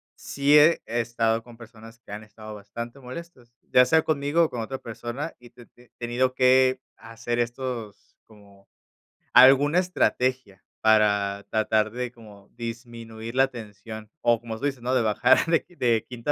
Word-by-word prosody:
sí 140 +1 +1
he 160 +3 +5
he 120 +1 -2
estado 115 -1 -1
con 120 0 -16
personas 115 -1 -14
que 115 - -17
han 105 +1 -7
estado 110 0 -12
bastante 115 +5 -8
molestos, 130 -1 -11
ya 125 - +4
sea 160 +5 +3
conmigo, 150 +2 +1
o 160 - +1
con 120 - -4
otra 135 +4 -5
persona, 120 +6 -6
y 120 - -15
he - - -18
te 120 0 -17
te 120 0 -24
tenido 125 +2 -1
que 130 0 +4 0.2
hacer 115 +1 -5
estos, 120 -3 -5
como 100 -2 -20 0.7
alguna 135 +6 +6
estrategia 130 - -1 0.2
para 105 -2 +2
tratar 110 0 +1
de 125 +1 -5
como 105 -4 -16
disminuir 115 -1 -8
la 135 +1 +3
tensión, 110 -1 -10
o 120 -1 +2
como 115 -1 -7
se 145 - -1
dice, 135 -2 -4
¿no?, 125 +2 -1
de 125 - +3
bajar 115 +4 +3
de 165 -1 +1
de 115 -3 +1
quinta 125 +3 -3
120 Hz, 170 wpm, -25 LUFS, 110-130 Hz, 0.7 s, alguna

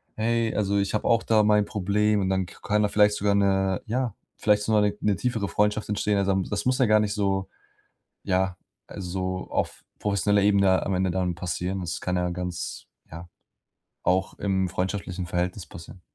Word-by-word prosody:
„Hey, 115 +1 0
also, 100 -1 +1
ich 100 +1 -1
habe - - -1
auch 115 -1 +3
da 110 -1 +4
mein 105 -1 +4
Problem”, 105 0 +1
und 95 - 0
dann 95 -1 0
k - - -15
kann 105 0 +1
da 105 - +1
vielleicht 105 0 +4
sogar 100 0 +1
'ne 95 -2 +2
ja, 125 -1 -1 0.2
vielleicht 105 -1 +2
sogar 110 -1 +3
'ne 105 -1 +2
'ne 105 -2 +2
tiefere 115 -5 -1
Freundschaft 105 +3 0
entstehen. 105 0 0
Also, 100 0 +1
da 95 - +2
m 95 - 0
das 105 - -2
muss 130 0 +2
ja 130 - +5
gar 110 0 +5
nicht 105 -1 -1
so, 95 -2 0 0.7
ja, 95 -1 0 0.3
also 95 0 -4
auf - - -2 0.2
professioneller 100 0 +2
Ebene 100 -2 +4
am 95 - 0
Ende 95 0 +1
dann 90 -1 -1
passieren. 90 +2 -3
Das 85 - -4
kann 90 0 -1
ja 90 0 0
ganz 90 -1 -5 0.2
ja, 85 +2 -9 0.8
auch 95 +1 +1
im 95 -2 0
freundschaftlichen 95 0 -3
Verhältnis 90 +2 -2
passieren. 85 +2 -12
100 Hz, 195 wpm, -25 LUFS, 95-105 Hz, 0.8 s, ja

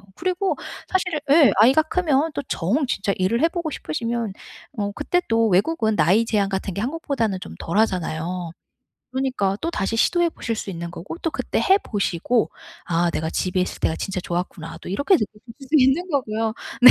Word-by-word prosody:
그리고 370 +2 0 0.3
사실 360 -4 0
예 295 -1 +7
아이가 265 +8 +6
크면 315 -2 +1
또 285 - -2
정 245 - 0
진짜 200 -4 0
일을 195 +8 +1
해 - - +7
보고 340 -2 -3
싶으시면 230 - -3 0.4
어 205 -1 -1
그때 355 +7 0
또 225 0 +3
외국은 220 - +2
나이 200 +8 +4
제한 205 -3 +1
같은 190 -1 -3
게 200 - -3
한국보다는 255 - -1
좀 - - -8
덜 170 +5 -2
하잖아요. 175 -4 0 0.6
그러니까 255 -7 0
또 335 - -1
다시 210 -1 -1
시도해 345 +7 +3
보실 230 -7 -3
수 205 - -5
있는 170 -1 -5
거고 190 - -7
또 330 - -1
그때 - - -2
해 385 +1 +4
보시고 205 - 0 0.3
'아. 170 0 +1
내가 160 0 -2
집에 185 +2 -1
있을 180 - -3
때가 160 - +1
진짜 190 -1 -3
좋았구나.' 170 -2 -4
또 - - -9
이렇게 285 - +2
느끼실 210 -3 -4 0.2
수도 275 +3 -6
있는 270 +7 +3
거고요. 225 -7 -1 0.3
네. 250 - +12
225 Hz, 365 characters per minute, -23 LUFS, 185-290 Hz, 0.6 s, 네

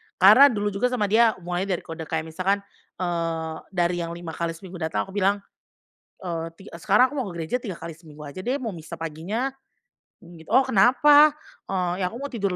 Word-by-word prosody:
karena 215 +9 +8
dulu 210 -5 -1
juga 200 +5 0
sama 215 -5 -1
dia, 225 0 +5
hubungannya 180 +2 -3
dari - - -9
kode 165 -1 -7
kayak 160 0 -2
misalkan, 195 +4 0 0.3
eee, 165 -2 -2
dari 175 -2 0
yang 170 0 -4
5x 170 -1 -4
seminggu 180 +1 -10
datang, 160 0 -1
aku 195 - -12
bilang, 200 0 +1 0.8
"eee, 165 -2 -3
ti - - -15 0.2
sekarang 245 - +4
aku - - -7
mau 220 - -3
gereja 170 +8 -3
3 195 -8 -6
kali 165 0 -7
seminggu 155 -2 -13
aja 145 +5 -8
deh, 250 +8 -1
mau 235 -6 -4
misa 170 -1 -9
paginya." 165 - -3 0.7
mmm, 170 -2 -14
"Oh 260 +3 +4
kenapa?" 290 +8 +5 0.6
"Ya 185 - +1
aku 220 - -8
mau 285 - -5
tidur 200 -6 -1
185 Hz, 185 wpm, -24 LUFS, 165-220 Hz, 0.8 s, karena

